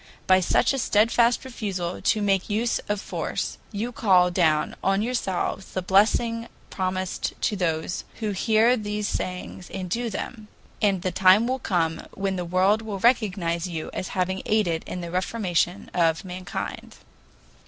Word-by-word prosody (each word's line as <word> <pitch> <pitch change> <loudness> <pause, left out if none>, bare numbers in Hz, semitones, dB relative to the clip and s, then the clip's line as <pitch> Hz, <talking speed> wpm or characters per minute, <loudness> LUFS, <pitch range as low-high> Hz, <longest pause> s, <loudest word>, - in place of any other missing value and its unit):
By 185 0 +5
such 185 - +2
a 270 - -1
steadfast 235 +3 +3
refusal 190 -8 -4
to 215 - +2
make 195 -1 +1
use 225 +3 +1
of 205 -1 0
force, - - -3
you 225 +3 -3
call 185 -6 +4
down 160 -4 +2
on 195 +2 +2
yourselves 195 -5 -2
the 185 - -2
blessing 230 +4 +2 0.2
promised 185 -1 -2
to 210 - +1
those 165 -2 -1
"who 215 -2 -2
hear 220 +5 +3
these 210 -2 -3
sayings 180 -1 -4
and 185 -1 -5
do 235 +2 -1
them," 215 +1 -6 0.3
and 195 -4 +2
the 185 - 0
time 190 +5 +5
will 260 +2 -1
come 165 -7 0
when 195 0 -1
the 180 - -2
world 185 +5 +3
will 215 -3 -5
recognize 190 -7 +1
you 165 -3 -5
as 185 - -3
having 190 +1 0
aided 180 -7 +1
in 180 - -5
the 170 -1 -6
reformation 185 -1 -1
of 165 0 +2
mankind. 180 -2 -6
195 Hz, 155 wpm, -25 LUFS, 180-215 Hz, 0.3 s, By